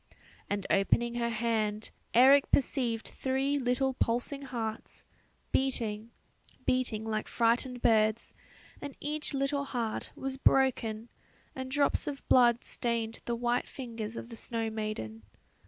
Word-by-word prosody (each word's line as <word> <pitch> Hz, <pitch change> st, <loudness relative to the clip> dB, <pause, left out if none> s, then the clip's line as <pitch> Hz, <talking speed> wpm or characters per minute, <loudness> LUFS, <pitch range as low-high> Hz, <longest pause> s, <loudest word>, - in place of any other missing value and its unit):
And 200 Hz, -1 st, -2 dB
opening 235 Hz, +4 st, +2 dB
her 235 Hz, -1 st, -1 dB
hand, 220 Hz, -2 st, -1 dB, 0.2 s
Eric 270 Hz, +3 st, +7 dB
perceived 240 Hz, -4 st, +1 dB
three 270 Hz, +2 st, 0 dB
little 260 Hz, +1 st, +1 dB
pulsing 245 Hz, +3 st, -1 dB
hearts, 235 Hz, -5 st, -5 dB, 0.5 s
beating, 230 Hz, -5 st, -1 dB, 0.6 s
beating 245 Hz, -4 st, 0 dB
like 215 Hz, -1 st, -2 dB
frightened 240 Hz, +2 st, +1 dB
birds 220 Hz, -1 st, +2 dB, 0.5 s
and 285 Hz, -2 st, -7 dB
each 300 Hz, 0 st, -2 dB
little 280 Hz, +1 st, 0 dB
heart 235 Hz, -5 st, -2 dB
was 265 Hz, 0 st, -4 dB
broken, 235 Hz, -5 st, +2 dB, 0.4 s
and 260 Hz, 0 st, -5 dB
drops 285 Hz, +1 st, +1 dB
of 280 Hz, -2 st, -5 dB
blood 240 Hz, -2 st, +5 dB
stained 230 Hz, -1 st, -1 dB
the 235 Hz, -, -1 dB
white 240 Hz, +1 st, 0 dB
fingers 230 Hz, -4 st, -6 dB
of 235 Hz, -, -7 dB
the 230 Hz, -, -8 dB
snow 225 Hz, -1 st, -2 dB
maiden. 215 Hz, -, -4 dB
235 Hz, 125 wpm, -30 LUFS, 220-265 Hz, 0.6 s, Eric